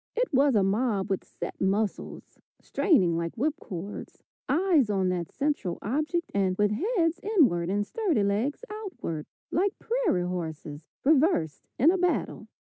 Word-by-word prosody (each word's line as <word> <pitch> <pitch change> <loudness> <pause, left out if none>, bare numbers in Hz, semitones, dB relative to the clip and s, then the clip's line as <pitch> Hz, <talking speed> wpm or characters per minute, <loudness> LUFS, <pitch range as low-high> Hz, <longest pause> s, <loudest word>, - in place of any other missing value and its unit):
It - - -1
was 275 -1 +4
a 200 - +4
mob 200 0 0
with 195 - -1
set - - -8
muscles, 200 +2 -2 0.2
straining 185 - +2
like 170 +6 -4
whip 295 +6 +1
cords, 190 +2 -8 0.3
eyes 310 - +3
on 190 -3 +1
that 175 -2 -3
central 275 - -1
object 305 - -1
and 190 -2 +1
with 210 0 +2
heads 340 - 0
inward 260 - +2
and 205 +1 0
sturdy 360 - 0
legs 225 - -1
outward, 375 - -5 0.2
like 390 +4 0
prairie 445 - 0
horses 160 -4 -5 0.2
reversed 280 - +2
in 295 +8 +5
a 375 - 0
battle. 360 0 -1
225 Hz, 145 wpm, -27 LUFS, -, 0.3 s, in